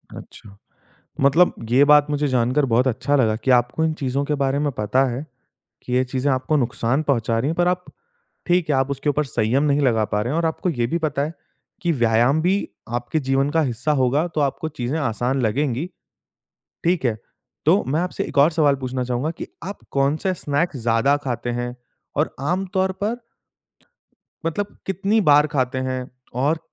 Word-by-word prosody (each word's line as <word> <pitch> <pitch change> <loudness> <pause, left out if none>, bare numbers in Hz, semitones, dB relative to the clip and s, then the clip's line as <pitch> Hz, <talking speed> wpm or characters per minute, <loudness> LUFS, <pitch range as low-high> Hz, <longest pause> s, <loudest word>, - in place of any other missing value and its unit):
अच्छा। 100 -1 -12 0.6
मतलब 155 +6 +4 0.2
ये 135 +4 +6
बात 150 0 +6
मुझे 145 0 0
जानकर 130 +3 +2
बहुत 125 +2 +2
अच्छा 130 +4 0
लगा 110 -5 +2
कि 130 - -2
आपको 125 +5 +3
इन 160 - +1
चीज़ों 140 -1 -2
के 150 - -1
बारे 135 +1 +1
में 145 -1 0
पता 125 +3 +1
है, 135 +6 -5 0.6
कि 125 - -7
ये 130 +1 +3
चीज़ें 130 +2 -1
आपको 150 +4 0
नुकसान 125 +2 0
पहुँचा 115 -5 0
रहीं 135 +6 0
हैं 165 - -3
पर 175 0 +3
आप 180 0 -1 0.6
ठीक 175 -2 +2
है - - +3
आप 135 +1 +1
उसके 140 +2 -3
ऊपर 150 +1 0
संयम 125 +1 0
नहीं 145 0 +2
लगा 115 -5 +2
पा 105 0 -1
रहे 120 +5 -2
हैं - - 0
और 165 - +1
आपको 165 +3 -1
ये 120 -6 -1
भी 170 +7 -1
पता 150 -3 -1
है, 155 +3 -3 0.5
कि 170 -1 +1
व्यायाम 120 +3 +3
भी 195 +3 +1 0.3
आपके 120 +6 -2
जीवन 135 +1 +1
का 160 +2 +2
हिस्सा 125 +3 -1
होगा 140 +6 +2
तो 155 - 0
आपको 145 +3 -1
चीज़ें 140 +1 -3
आसान 130 0 -1
लगेंगी, 130 +6 0 1.0
ठीक 170 -5 +1
है। 110 -3 +1 0.5
तो 185 +6 +4
मैं 150 +5 +1
आपसे 180 - -2
एक - - -8
और 145 +4 +6
सवाल 150 -3 +3
पूछना 130 -1 -3
चाहूँगा 125 +5 -1
कि - - -6 0.2
आप 200 +2 -6
कौन-सा 145 +7 +1
स्नैक्स 150 -1 -1
ज़्यादा 115 +5 +3
खाते 120 -1 -2
हैं? 120 0 -3 0.4
और - - 0
आमतौर 190 +5 0
पर 225 +4 -1 1.3
मतलब 200 +5 -2
कितनी 195 +3 +1
बार 150 +1 +6
खाते 130 -3 -1
हैं? 130 -1 -3 0.3
और 145 +6 +1
140 Hz, 190 wpm, -22 LUFS, 125-155 Hz, 1.3 s, ये